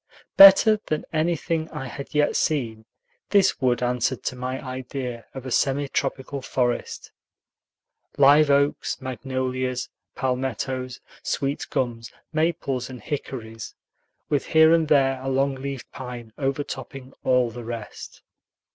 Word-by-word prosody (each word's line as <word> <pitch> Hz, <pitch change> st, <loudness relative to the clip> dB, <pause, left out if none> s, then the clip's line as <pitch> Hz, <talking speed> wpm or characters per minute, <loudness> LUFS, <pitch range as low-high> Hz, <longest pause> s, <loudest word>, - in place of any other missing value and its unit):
Better 195 Hz, +2 st, +9 dB
than 155 Hz, -, -2 dB
anything 165 Hz, 0 st, 0 dB
I 150 Hz, -4 st, -6 dB
had 140 Hz, +3 st, -8 dB
yet 150 Hz, 0 st, +2 dB
seen, 115 Hz, -8 st, -1 dB, 0.4 s
this 200 Hz, -2 st, +3 dB
wood 125 Hz, -1 st, +2 dB
answered 125 Hz, -1 st, 0 dB
to -, -, -2 dB
my 130 Hz, +1 st, -4 dB
idea 130 Hz, -2 st, -6 dB
of 130 Hz, -1 st, -7 dB
a 130 Hz, -, -5 dB
semi 140 Hz, +3 st, +1 dB
tropical 135 Hz, 0 st, -3 dB
forest: 125 Hz, -2 st, -2 dB, 1.1 s
live 145 Hz, +2 st, +6 dB
oaks, 140 Hz, +1 st, +1 dB
magnolias, 130 Hz, 0 st, -3 dB, 0.3 s
palmettos, 130 Hz, 0 st, -3 dB, 0.2 s
sweet 140 Hz, +1 st, -2 dB
gums, 115 Hz, -3 st, -2 dB, 0.2 s
maples, 145 Hz, -6 st, -1 dB
and 130 Hz, -1 st, -8 dB
hickories, 115 Hz, -4 st, -6 dB, 0.5 s
with 145 Hz, -2 st, -1 dB
here 160 Hz, 0 st, +6 dB
and 165 Hz, -2 st, +3 dB
there 135 Hz, -3 st, +3 dB
a 135 Hz, -, -6 dB
long 135 Hz, +1 st, +1 dB
leaved 135 Hz, -1 st, -6 dB
pine 120 Hz, -3 st, -8 dB
overtopping 135 Hz, -1 st, -4 dB
all 125 Hz, -2 st, +2 dB
the 120 Hz, +1 st, -8 dB
rest. 115 Hz, -2 st, -8 dB
130 Hz, 125 wpm, -24 LUFS, 125-140 Hz, 1.1 s, Better